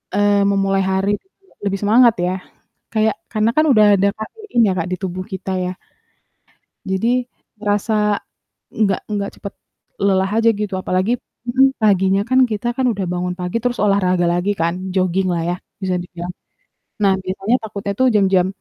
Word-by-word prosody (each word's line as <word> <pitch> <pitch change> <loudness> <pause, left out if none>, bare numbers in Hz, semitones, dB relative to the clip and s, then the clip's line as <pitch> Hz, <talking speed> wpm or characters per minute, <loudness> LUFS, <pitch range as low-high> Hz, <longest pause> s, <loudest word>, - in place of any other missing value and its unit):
eee, 205 0 +3
memulai 195 -1 +2
hari 190 +1 +1
gitu 385 - -42
ya, - - -27
lebih 195 -1 -1
semangat 230 +3 +5
ya. 180 - 0 0.6
Kayak 220 -1 +2 0.2
karena 215 0 +2
kan 310 - +5
udah 215 -3 +6
ada 200 +1 +3
kafein 395 - -4
ya - - +2
Kak, 165 - -2
di - - 0
tubuh 185 0 -4
kita 190 0 -5
ya. 180 - -2 1.2
Jadi 190 +4 0 0.5
rasa 210 +1 0 0.8
nggak 200 -3 0
nggak 200 -1 -2
cepet 200 - -7 0.5
lelah 190 -1 +2
aja 225 +1 +4
gitu. 205 -1 -4
Apalagi 185 +5 0 0.4
mhm, 265 +2 +3
paginya 195 -1 +3
kan, 260 - +4
kita 215 +3 -2
kan 260 - +1
udah 200 -3 -3
bangun 180 0 -2
pagi 180 +5 -2
terus 245 0 -1
olahraga 185 -3 +2
lagi 180 +4 0
kan, 170 +1 +1 0.2
joginglah 185 -1 +1
ya, 175 - 0 0.3
bisa 185 -1 0
dibilang. 175 0 -7 0.7
Nah 195 -1 +5
biasanya 195 +6 0
takutnya 200 -2 -4
tuh 260 - +5
jam-jam 190 -3 +3
200 Hz, 160 wpm, -19 LUFS, 185-215 Hz, 1.2 s, udah